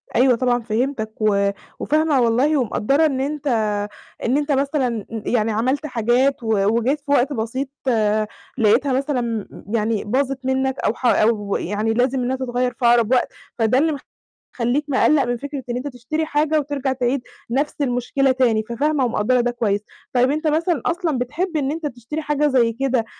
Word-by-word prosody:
أيوه 255 Hz, 0 st, +5 dB
طبعًا 245 Hz, 0 st, +1 dB
فهمتاك، 225 Hz, -1 st, -2 dB
و 200 Hz, -2 st, +2 dB, 0.3 s
وفاهمة 305 Hz, -3 st, +2 dB
والله 250 Hz, +6 st, +3 dB
ومقدرة 275 Hz, +4 st, +2 dB
إن 270 Hz, -4 st, 0 dB
أنت 290 Hz, +1 st, -3 dB, 0.8 s
إن 250 Hz, +4 st, +2 dB
أنت 295 Hz, 0 st, -1 dB
مثلًا 270 Hz, -5 st, 0 dB
ي 225 Hz, -2 st, -4 dB
يعني 225 Hz, -2 st, +2 dB
عملت 255 Hz, +7 st, 0 dB
حاجات 250 Hz, +1 st, +1 dB
و 215 Hz, -3 st, +1 dB
وجيت 265 Hz, +6 st, 0 dB
في 285 Hz, 0 st, -6 dB
وقت 285 Hz, +1 st, +3 dB
بسيط 255 Hz, +3 st, -3 dB, 0.9 s
لقيتها 240 Hz, +4 st, +3 dB
مثلًا 245 Hz, -6 st, -1 dB, 0.3 s
يعني 220 Hz, -1 st, 0 dB
باظت 265 Hz, +4 st, -1 dB
منّك 265 Hz, 0 st, 0 dB
أو 215 Hz, -, +1 dB
ح 250 Hz, -, -8 dB
أو 215 Hz, -4 st, +2 dB
يعني 210 Hz, +4 st, -1 dB
لازم 250 Hz, +3 st, +1 dB
إنّها 255 Hz, +2 st, 0 dB
تتغيّر 250 Hz, -1 st, -1 dB
في 245 Hz, -, -3 dB
أقرب 235 Hz, -1 st, +4 dB
وقت، 255 Hz, -, +3 dB, 0.3 s
فده 225 Hz, +2 st, +3 dB
اللي 305 Hz, +1 st, +2 dB, 0.6 s
مخلّيك 250 Hz, +5 st, 0 dB
مقلّق 285 Hz, +1 st, +3 dB
من 245 Hz, -1 st, -1 dB
فكرة 280 Hz, +1 st, -6 dB
إن 240 Hz, -, -1 dB
أنت 255 Hz, +3 st, -4 dB
تشتري 285 Hz, +5 st, -3 dB
حاجة 310 Hz, 0 st, +1 dB
وترجع 280 Hz, -2 st, -2 dB
تعيد 255 Hz, +1 st, 0 dB, 0.3 s
نفس 280 Hz, +4 st, 0 dB
المشكلة 265 Hz, +1 st, +1 dB
تاني، 240 Hz, -4 st, +2 dB
ففاهمة 280 Hz, +3 st, +1 dB
ومقدرة 240 Hz, +2 st, +1 dB
ده 245 Hz, 0 st, 0 dB
كويّس، 210 Hz, -4 st, 0 dB, 0.3 s
طيّب 250 Hz, +1 st, +3 dB
أنت 310 Hz, +2 st, -1 dB
مثلًا 315 Hz, -1 st, +1 dB
أصلًا 335 Hz, -5 st, 0 dB
بتحب 310 Hz, +8 st, -2 dB
إن 280 Hz, -2 st, 0 dB
أنت 320 Hz, +1 st, -4 dB
تشتري 250 Hz, +4 st, -6 dB
حاجة 295 Hz, 0 st, +1 dB
زي 245 Hz, -5 st, +2 dB
كده 255 Hz, -1 st, 0 dB
255 Hz, 170 wpm, -21 LUFS, 235-285 Hz, 0.9 s, أيوه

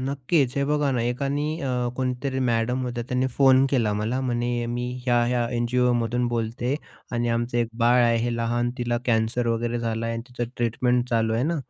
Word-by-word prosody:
नक्कीच. 135 Hz, 0 st, 0 dB
हे 140 Hz, -, +2 dB
बघा 150 Hz, -1 st, +1 dB
ना, 120 Hz, -2 st, 0 dB
एकानी 140 Hz, +6 st, -1 dB
अ, 125 Hz, -3 st, -1 dB
कोणीतरी 130 Hz, +1 st, -2 dB
मॅडम 125 Hz, 0 st, 0 dB
होत्या 120 Hz, -1 st, -3 dB
त्यांनी 125 Hz, +1 st, +1 dB
फोन 135 Hz, -1 st, +6 dB
केला 115 Hz, -6 st, +2 dB
मला. 110 Hz, +5 st, -1 dB
म्हणे, 120 Hz, -1 st, -1 dB
"मी 120 Hz, +1 st, -3 dB
ह्या-ह्या 120 Hz, -1 st, +2 dB
एनजीओमधून 120 Hz, 0 st, +1 dB
बोलते 120 Hz, +3 st, -1 dB, 0.4 s
आणि 120 Hz, 0 st, 0 dB
आमचं 120 Hz, +1 st, 0 dB
एक 115 Hz, -1 st, +1 dB
बाळ 120 Hz, +1 st, +4 dB
आहे 115 Hz, 0 st, +3 dB
हे 120 Hz, -, -1 dB
लहान 120 Hz, +1 st, 0 dB
तिला 120 Hz, -1 st, 0 dB
कॅन्सर 115 Hz, +1 st, +1 dB
वगैरे 115 Hz, +1 st, -1 dB
झाला 115 Hz, 0 st, -2 dB
आहे 115 Hz, -, -2 dB
आणि 115 Hz, -, -4 dB
तिचं 120 Hz, -1 st, -4 dB
ट्रीटमेंट 125 Hz, +1 st, +1 dB
चालू 115 Hz, -1 st, +1 dB
आहे 115 Hz, -, +1 dB
ना, 170 Hz, +2 st, 0 dB
120 Hz, 185 wpm, -24 LUFS, 115-130 Hz, 0.4 s, फोन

